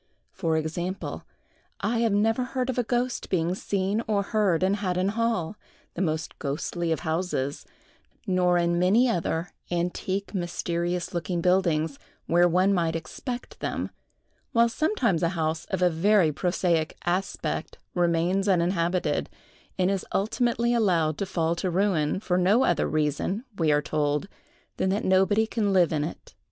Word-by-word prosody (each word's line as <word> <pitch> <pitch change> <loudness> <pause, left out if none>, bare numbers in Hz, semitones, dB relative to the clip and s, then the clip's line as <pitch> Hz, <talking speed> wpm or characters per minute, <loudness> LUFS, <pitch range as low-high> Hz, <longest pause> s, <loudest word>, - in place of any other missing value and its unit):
For 165 -3 0
example, 170 +4 -4 0.5
I 230 +3 +1
never 225 +4 +2
heard 255 0 -2
of 250 - -3
a - - +2
ghost 245 +2 -1
being 175 -1 +1
seen 200 +2 -1
or 205 -2 +1
heard 200 -5 +1
in 190 +1 +3
Haddon 185 -2 0
hall, 220 -4 -1 0.4
the 170 - -4
most 160 -3 -2
ghostly 165 +3 -2
of 160 - 0
houses; 160 -4 -2 0.6
nor 180 -3 +2
in 170 0 +1
many 205 +8 +4
other 170 -5 -1 0.2
antique, 180 +3 -2
mysterious 175 -1 -2
looking 175 +1 -2
buildings, 170 -5 +1 0.3
where 175 +1 +4
one 185 +3 +3
might 165 -3 +1
expect 240 - -6
them, - - -3 0.6
while 235 0 +4
sometimes 240 - +1
a 170 - +2
house 160 0 -1
of 185 -2 -1
a 180 - +5
very 180 0 +3
prosaic 170 0 0
aspect 180 +3 -2 0.2
remains 175 +3 +1
uninhabited, 175 -1 +1 0.5
and 185 0 +2
is 195 -2 -1
ultimately 235 +3 +1
allowed 175 -9 +2
to 200 - -2
fall 165 -3 0
to 185 - -1
ruin, 180 -3 +1
for 180 -3 0
no 205 +8 +4
other 175 - +2
reason, 155 - -1
we 160 -2 +3
are 150 0 +2
told, 150 +2 0 0.5
than 190 - +1
that 200 +3 0
nobody 190 +4 +3
can 220 -2 0
live 180 -4 +3
in 150 -1 0
it. 155 - -7
180 Hz, 150 wpm, -26 LUFS, 165-205 Hz, 0.6 s, a